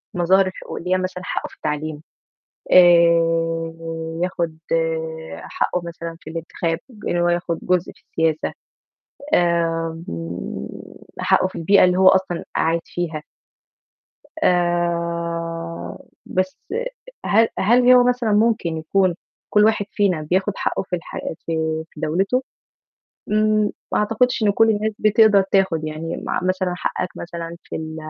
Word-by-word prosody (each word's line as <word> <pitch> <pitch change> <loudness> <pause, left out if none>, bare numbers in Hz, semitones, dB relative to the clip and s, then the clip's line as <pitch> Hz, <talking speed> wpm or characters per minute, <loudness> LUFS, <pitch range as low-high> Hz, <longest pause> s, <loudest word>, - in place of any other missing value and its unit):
المظاهر 185 +2 +4
الحقوق 185 - -7
اللي 180 - -5
هي - - +3
مثلًا 185 0 -4
حقّه - - -3
في - - -17
التعليم، 150 0 -4 0.7
آآ، 165 -2 +5 0.5
بياخُد 170 -3 -2 0.8
حقّه 180 - -2
مثلًا 170 -1 -7
في - - -10
الانتخاب، 165 0 -3 0.3
إن - - 0
هو 175 0 +2
ياخُد 175 -1 -1
جزء 180 -1 +1
في - - -26
السياسة، 160 -1 -1 0.8
آمم، 165 - -1 0.5
حقّه - - +3
في - - -11
البيئة 195 +5 +5
اللي 180 0 +3
هو 190 0 +7
أصلًا 185 -2 +1
قاعد 165 +1 +2
فيها. 165 -3 -4 1.2
آآ، 170 - -1 0.3
بس 185 0 -1 0.7
هل 225 +2 +4
هل 245 +5 +5
هو 250 -1 +7
مثلًا 245 -2 +1
ممكن 210 -6 +2
يكون 180 +3 +1 0.3
كل 210 0 +5
واحد 215 -2 +2
فينا 190 -6 +1
بياخُد 185 +6 0
حقّه - - -1
في 180 - -3
الحياة 165 -1 -6
في 160 -1 -1
في - - -14
دَولته؟ 195 - 0 0.9
إمم، 215 0 +2 0.2
ما - - +2
أعتقدش 225 +3 +1
إن 210 - +4
كل 225 +2 +4
الناس 215 0 0
بتقدر 215 -1 +5
تاخُد، 190 -5 +2
يعني 155 +2 -4
مع - - -2
مثلًا 185 0 0
حقّك 180 0 -2
مثلًا 170 0 -6
في - - -7
ال 160 0 -6
175 Hz, 130 wpm, -21 LUFS, 165-195 Hz, 1.2 s, هو